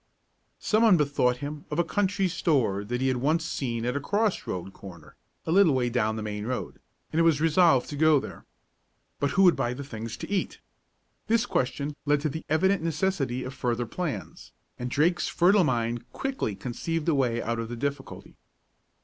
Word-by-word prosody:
Some 215 +1 +1
one 220 -6 +6
bethought 140 -4 +1
him 145 0 -7
of 150 - -3
a 175 - +3
country 195 +1 0
store 135 - +1
that 125 +4 -3
he 135 - +2
had 130 -1 +1
once 155 +6 +1
seen 120 -8 -3
at 125 +2 -1
a - - 0
cross 205 +6 0
road 95 +1 -5
corner 85 -6 -12 0.3
a - - -2
little 180 -5 +5
way 125 -2 0
down 110 -3 0
the 110 - -4
main 105 0 -4
road, 125 0 -4 0.3
and 160 - +1
it - - +5
was 165 -3 +4
resolved 160 -4 +4
to - - -4
go 155 0 +4
there. - - -9 0.8
But 140 - +1
who 195 - +6
would 180 -2 +6
buy 120 +1 -1
the 140 - -6
things 115 -3 -7
to - - -7
eat? 195 -2 -1 0.7
This 230 +1 +2
question 140 - -2
led 145 0 +3
to 155 - 0
the 160 +3 -6
evident 190 +4 +2
necessity 155 -6 -1
of 130 - -6
further 120 -2 -1
plans, 145 - -6 0.3
and 125 0 -3
Drake's 170 +7 +1
fertile 185 +3 +4
mind 120 -2 -2
quickly 265 - -3
conceived 155 - -4
a 165 - +3
way 125 -4 +1
out 115 0 -2
of 115 0 -4
the 120 - -4
difficulty. 140 +1 -5
140 Hz, 195 wpm, -27 LUFS, 120-165 Hz, 0.8 s, one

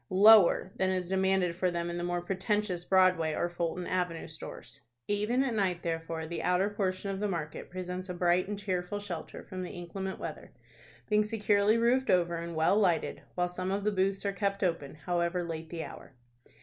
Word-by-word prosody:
lower 200 -1 +7
than 190 - +2
is 185 -1 -1
demanded 190 -2 +2
for 185 +1 +1
them 170 -1 -2
in 170 - -3
the 175 - -3
more 175 0 -1
pretentious 190 0 -1
Broadway 180 -4 +3
or 175 - 0
Fulton 175 +1 -3
Avenue 180 -3 -2
stores. - - -9 0.3
Even 210 +6 +1
at 260 -3 -1
night, 190 -5 0
therefore, 165 -1 -3
the 170 +2 -4
outer 185 +3 +2
portion 195 -1 -2
of 195 - -4
the 210 - 0
market 165 -6 -4
presents 185 +1 -5
a 180 - -3
bright 175 +1 +2
and 205 0 -3
cheerful 190 0 -2
shelter 185 -5 -6
from 185 -2 -6
the 180 - -5
inclement 190 +2 -5
weather, 155 -2 -7 0.5
being 210 0 +3
securely 210 0 +2
roofed 245 +3 +2
over, 170 -2 +3
and 170 0 -5
well 160 +5 +3
lighted, 180 -6 +1
while 180 0 +1
some 185 +1 -4
of 200 +1 -1
the 210 - +2
booths 195 0 0
are 200 - 0
kept 200 0 -1
open, 165 -6 -1
however 175 +3 -1
late 165 -1 -5
the 165 -1 -4
hour. 135 - -11
185 Hz, 195 wpm, -30 LUFS, 175-200 Hz, 0.5 s, lower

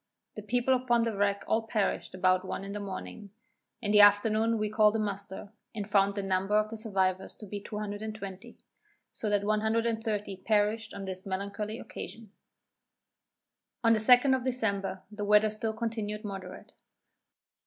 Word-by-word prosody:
The 215 - -7
people 245 +5 +1
upon 240 -2 +2
the 230 -2 -1
wreck 200 0 +1
all 225 - +1
perished 210 -4 -1
about 185 0 +3
one 190 - -5
in 200 0 -6
morning. 200 +1 -7 0.5
In 205 - 0
the 210 0 +7
afternoon 215 +2 +5
we 215 0 0
called 215 0 +4
a - - +1
muster, 200 -1 -5 0.2
and 205 -2 -4
found 200 -1 +3
the 200 - -2
number 195 +2 +1
of 215 0 +1
the 225 - -6
survivors 190 -4 -1
to 215 - -10
be 205 0 -6
220; 210 0 -6 0.5
so 215 - -3
that 205 -1 +1
130 220 -1 0
perished 210 +2 0
on 195 - -6
this 190 0 -6
melancholy 200 +3 -3
occasion. 225 -3 -9 1.5
On 230 0 +5
the 220 - +2
2d 250 +4 +6
of 255 - -3
December, 200 -7 -1
the 210 0 -5
weather 210 +1 +4
still 220 +1 -3
continued 220 -2 -3
moderate. 190 -2 -8
210 Hz, 155 wpm, -30 LUFS, 200-220 Hz, 1.5 s, the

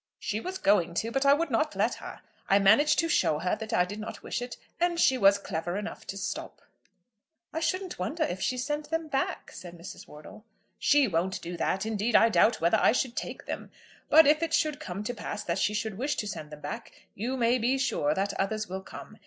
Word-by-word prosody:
"She 210 - -3
was 370 +10 -5
going 175 - +2
to, 225 +5 -1
but 270 +3 +1
I 280 - +8
would 325 -1 -2
not 305 +7 +1
let - - +1
her. - - -9 0.3
I 195 - +6
managed 220 +10 +5
to 330 - +2
show 155 - +2
her 180 +5 0
that 220 0 -6
I 180 - +3
did 205 +3 -7
not 215 - -7
wish - - -3
it, 245 0 -6 0.2
and 345 0 +1
she 265 - +5
was 200 -4 +5
clever 175 -2 -4
enough 205 - -6
to 195 - -5
stop." 200 - -5 0.9
"I 320 - -1
shouldn't 370 - -2
wonder 300 - -1
if 190 -10 -3
she 255 - 0
sent 295 +4 -3
them 325 -1 -2
back," 270 -1 -2
said 175 -1 -10
Mrs. 170 +3 -10
Wortle. 150 +7 -12 0.4
"She 290 -2 +4
won't 185 0 -1
do 175 +1 -5
that. 190 +3 -1
Indeed, 220 +1 -1
I 230 - +7
doubt 220 +1 +4
whether 170 +1 +3
I - - +5
should 250 -1 -1
take - - -5
them. - - -5 0.4
But 320 +1 +8
if 300 +2 +4
it 330 -1 +1
should 305 -1 0
come 195 -8 -5
to 245 - -3
pass 225 - -5
that 170 +2 -1
she 210 +2 +1
should 210 -1 -3
wish 285 +4 0
to 210 - -3
send 155 -6 -6
them 150 -1 -11
back, 145 - -6 0.2
you 245 +6 -3
may 240 +1 +2
be 250 +4 +1
sure 225 - 0
that 195 +1 -1
others 215 +2 -1
will 190 +1 -5
come. - - -11
220 Hz, 230 wpm, -28 LUFS, 190-280 Hz, 0.9 s, I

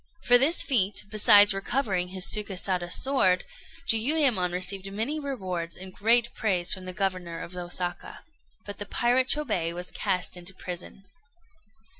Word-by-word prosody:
For 245 0 +5
this 305 +6 +3
feat, 210 -7 +1
besides 205 -1 +7
recovering 195 -2 -1
his 185 0 -2
Sukésada 185 -4 0
sword, 185 -8 +2 0.4
Jiuyémon 230 - +2
received 190 +2 -1
many 230 +10 -3
rewards 185 - -5
and 185 0 -9
great 235 +4 +2
praise 185 -5 0
from 185 -1 -7
the 185 - -6
Governor 185 -3 -3
of 175 - -9
Osaka. 175 0 -5 0.4
But 205 - -9
the 205 - -6
pirate 245 +4 +1
Chôbei 180 - 0
was 180 +1 -5
cast 180 -1 -2
into 180 +1 -4
prison. 180 +2 -7
195 Hz, 140 wpm, -26 LUFS, 180-235 Hz, 0.4 s, besides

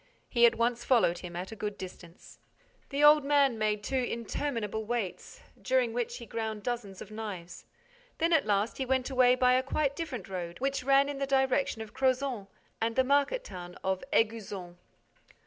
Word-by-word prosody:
He 235 -1 +5
at 230 - +1
once 235 +1 0
followed 230 -9 +3
him 175 -1 -8
at 180 +4 -5
a - - -6
good 210 -1 -4
distance. 180 -2 -11 0.5
The 280 +1 0
old 295 0 +8
man 280 -4 +3
made 210 -1 0
two 265 - -1
interminable 230 -2 -3
waits, 220 -4 -4 0.2
during 255 -3 +1
which 240 0 -2
he 235 - -9
ground 220 -2 -4
dozens 230 -6 -4
of 210 - -15
knives. 195 -6 -7 0.5
Then, 335 +1 +2
at 300 -8 +3
last, 205 +4 0
he - - +1
went 260 +1 0
away 250 -1 +5
by 250 0 +4
a 255 - +4
quite 280 +1 -1
different 265 - -5
road, 175 -2 -5
which 275 0 -1
ran 275 +1 +4
in 285 -1 -4
the 275 - -1
direction 265 -3 +1
of 215 - -13
Crozant 260 -5 0 0.3
and 225 0 0
the 260 - +4
market 285 - +2
town 180 - -9
of 190 -1 -1
Éguzon. 205 -6 -1
235 Hz, 180 wpm, -30 LUFS, 210-270 Hz, 0.5 s, old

